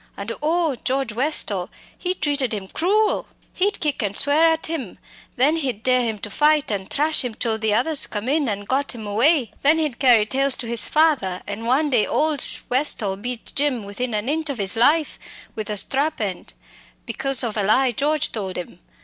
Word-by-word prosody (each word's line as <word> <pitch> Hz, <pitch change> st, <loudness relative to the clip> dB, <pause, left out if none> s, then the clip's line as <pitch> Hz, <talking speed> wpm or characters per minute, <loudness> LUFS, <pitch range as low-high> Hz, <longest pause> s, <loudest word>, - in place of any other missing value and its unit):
And 200 Hz, +3 st, -5 dB
oh! 325 Hz, 0 st, +1 dB
George 265 Hz, -3 st, -1 dB
Westall 215 Hz, -, -1 dB, 0.3 s
he 365 Hz, 0 st, -2 dB
treated 285 Hz, -8 st, 0 dB
him 195 Hz, -2 st, -6 dB
cruel. 415 Hz, -, +1 dB, 0.3 s
He'd 405 Hz, +3 st, 0 dB
kick 295 Hz, -4 st, -1 dB
and 205 Hz, -1 st, -2 dB
swear 310 Hz, +3 st, +3 dB
at 320 Hz, 0 st, -1 dB
him; 290 Hz, -, -4 dB, 0.4 s
then 290 Hz, +6 st, +3 dB
he'd 255 Hz, -8 st, -3 dB
dare 255 Hz, 0 st, +3 dB
him 225 Hz, -3 st, -2 dB
to 205 Hz, 0 st, -8 dB
fight, 300 Hz, +1 st, +2 dB
an' 195 Hz, -2 st, -3 dB
thrash 300 Hz, +1 st, +1 dB
him 245 Hz, -3 st, -4 dB
till 225 Hz, -2 st, -1 dB
the 215 Hz, -1 st, +1 dB
others 285 Hz, +6 st, +2 dB
came 210 Hz, +2 st, -5 dB
in, 285 Hz, -1 st, +1 dB
an' 205 Hz, -1 st, -3 dB
got 265 Hz, +5 st, -1 dB
him 220 Hz, -2 st, -8 dB
away. 240 Hz, +5 st, +2 dB
Then 300 Hz, +3 st, +4 dB
he'd 300 Hz, -6 st, -2 dB
carry 240 Hz, -5 st, +5 dB
tales 270 Hz, +4 st, +1 dB
to 240 Hz, -, -4 dB
his 235 Hz, -1 st, -2 dB
father, 290 Hz, -, +2 dB
and 210 Hz, +3 st, -5 dB
one 285 Hz, +4 st, +2 dB
day 230 Hz, -5 st, +3 dB
old 305 Hz, -3 st, +1 dB, 0.2 s
Westall 245 Hz, -7 st, 0 dB
beat 240 Hz, +3 st, -6 dB
Jim 275 Hz, -6 st, 0 dB
within 215 Hz, +4 st, -4 dB
an 210 Hz, +3 st, -2 dB
inch 310 Hz, +2 st, -1 dB
of 270 Hz, -5 st, -4 dB
'is 195 Hz, +1 st, +1 dB
life, 295 Hz, +7 st, +2 dB, 0.3 s
with 215 Hz, -1 st, -5 dB
a 210 Hz, -, -2 dB
strap 280 Hz, +9 st, 0 dB
end, 195 Hz, -5 st, -4 dB, 0.5 s
because 275 Hz, -1 st, +2 dB
of 230 Hz, -3 st, -3 dB
a 210 Hz, -, 0 dB
lie 245 Hz, +6 st, +3 dB
George 295 Hz, +5 st, 0 dB
told 195 Hz, -4 st, -4 dB
'im. 175 Hz, 0 st, -7 dB
255 Hz, 200 wpm, -22 LUFS, 215-300 Hz, 0.5 s, carry